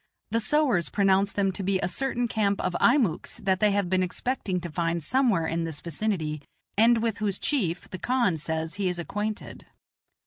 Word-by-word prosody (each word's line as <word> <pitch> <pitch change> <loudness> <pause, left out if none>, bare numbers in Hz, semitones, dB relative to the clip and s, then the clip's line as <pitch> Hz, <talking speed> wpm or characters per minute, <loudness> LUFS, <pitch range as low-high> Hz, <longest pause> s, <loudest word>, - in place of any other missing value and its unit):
The 230 - +2
sowars 230 - +2
pronounce 195 0 +2
them 195 -1 +1
to 195 - -3
be 190 0 +1
a - - 0
certain 245 +5 -1
camp 205 -3 0
of 175 - -1
Einiucks 235 - +2
that 190 -1 +2
they 210 0 +4
have 200 -2 +1
been 185 +1 +1
expecting 185 0 -2
to 175 -1 -6
find 170 0 -1
somewhere 230 - +2
in 165 +1 -1
this 160 -3 -4
vicinity, 165 -5 -2 0.3
and 225 +2 +4
with 225 -2 -1
whose 205 -3 -1
chief 195 - -1
the 185 - -6
khan 240 -9 +1
says 160 +3 -3
he 190 - +2
is 180 - -2
acquainted. 210 +5 -5
195 Hz, 185 wpm, -27 LUFS, 170-220 Hz, 0.3 s, they